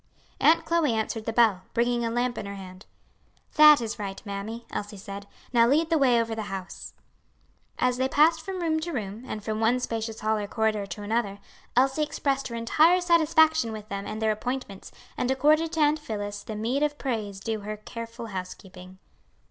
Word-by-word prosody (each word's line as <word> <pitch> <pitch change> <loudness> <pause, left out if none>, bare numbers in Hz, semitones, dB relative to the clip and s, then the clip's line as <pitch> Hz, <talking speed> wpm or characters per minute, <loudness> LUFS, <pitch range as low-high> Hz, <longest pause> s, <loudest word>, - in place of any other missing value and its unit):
Aunt 325 - +4
Chloe 330 -6 +2
answered 220 0 -2
the 225 - -1
bell, 220 -5 +3
bringing 240 0 +1
a 230 - 0
lamp 245 +1 0
in 200 - -6
her 200 - -6
hand. 185 0 -11 0.7
"That 300 -1 +8
is 230 -1 -4
right, 195 -2 -5
mammy," 210 +4 -6
Elsie 205 0 -5
said. 200 0 -8 0.3
"Now 235 -1 +5
lead 315 +6 +2
the 325 - +4
way 250 -4 +4
over 230 -1 -1
the 220 -2 -5
house." 190 -1 -7 0.8
As 250 0 +1
they 260 +1 0
passed 315 +4 +4
from 380 -2 -5
room 315 -1 +1
to 340 +1 -4
room, 215 -2 -5
and 215 - -5
from 215 0 -3
one 230 +3 +2
spacious 225 -2 -4
hall 215 0 +1
or 205 - -4
corridor 215 -2 0
to 205 +1 -7
another, 205 -1 -1 0.4
Elsie 265 +4 +3
expressed 275 -2 -1
her 235 - -6
entire 310 +10 +4
satisfaction 315 -6 +3
with 215 -1 -8
them 200 0 -4
and 215 - -5
their 220 - +3
appointments, 215 -2 -5 0.3
and 250 - -1
accorded 305 +5 +3
to 325 - -2
Aunt 300 +1 +3
Phillis 205 -6 -5
the 215 - -7
meed 235 +6 -1
of 295 -1 0
praise 215 -7 -3
due 220 +2 -3
her 210 +1 -6
careful 230 +2 -8
housekeeping. 185 -2 -8
230 Hz, 195 wpm, -26 LUFS, 210-275 Hz, 0.8 s, That